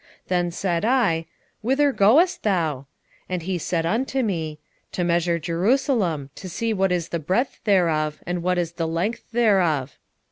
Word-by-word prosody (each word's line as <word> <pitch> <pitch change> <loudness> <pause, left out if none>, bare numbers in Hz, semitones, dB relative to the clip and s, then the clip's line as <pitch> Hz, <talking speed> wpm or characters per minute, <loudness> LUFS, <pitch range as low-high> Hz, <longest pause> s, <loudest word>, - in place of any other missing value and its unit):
2:2 - - -40
Then 175 -1 +1
said 175 0 -1
I, 220 -10 +2 0.4
Whither 270 +5 +2
goest 275 - +4
thou? 160 -9 0 0.4
And 180 -2 -2
he 180 0 -2
said 165 0 -1
unto 260 +8 0
me, 160 -8 -2 0.4
To 180 - -1
measure 170 0 +1
Jerusalem, 175 - 0
to 185 - -9
see 225 +6 -1
what 195 -2 +1
is 175 -2 -1
the 170 - -2
breadth 190 - -1
thereof, 160 -7 +2
and 175 0 -2
what 180 +1 0
is 170 -2 -1
the 165 -1 -3
length 170 +8 -2
thereof. 185 - +2
180 Hz, 165 wpm, -23 LUFS, 165-220 Hz, 0.4 s, goest